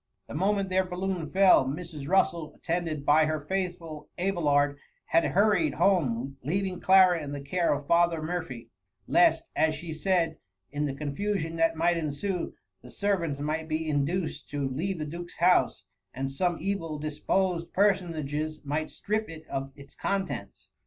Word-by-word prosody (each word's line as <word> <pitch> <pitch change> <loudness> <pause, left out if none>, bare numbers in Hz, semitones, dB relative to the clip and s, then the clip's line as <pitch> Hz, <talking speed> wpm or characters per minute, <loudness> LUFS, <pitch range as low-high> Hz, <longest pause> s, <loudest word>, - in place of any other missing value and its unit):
The - - -8
moment 195 +4 +1
their 185 0 +2
balloon 180 -2 -3
fell, 190 -6 +6
Mrs. 150 0 -5
Russel, 165 -4 +1
attended 165 -4 -2
by 155 +2 +5
her 155 0 -1
faithful 175 -2 -4
Abelard, 145 -6 +1 0.3
had 165 +1 +3
hurried 190 -7 +2
home, 140 -8 +1
leaving 185 +6 -2
Clara 185 -3 +5
in 145 -1 -5
the 145 - -4
care 170 +5 0
of 145 0 -1
Father 170 +1 +3
Mur 175 +3 -2
phy; 130 -7 -9 0.4
lest, - - +4
as 160 -1 +2
she 160 +1 -6
said, 165 -1 0 0.3
in 145 +1 -1
the 135 - -4
confusion 165 +4 -2
that 165 0 +2
might 170 +2 +2
ensue, 165 +4 -3 0.3
the - - -13
servants 175 -8 -1
might 155 +2 -2
be 160 0 -2
induced 155 +4 -1
to 145 -2 -2
leave 170 +9 -2
the 155 - -3
Duke^s 175 +3 -8
house, 175 - +3 0.3
and 135 +1 -3
some 175 +4 0
evil 165 -3 -2
disposed 165 +4 -1
personages 155 -6 0
might 150 +2 -2
strip 215 0 -2
it 160 -1 -10
of 135 0 -3
its 140 -1 -13
contents. 190 - -4
165 Hz, 160 wpm, -28 LUFS, 150-185 Hz, 0.4 s, fell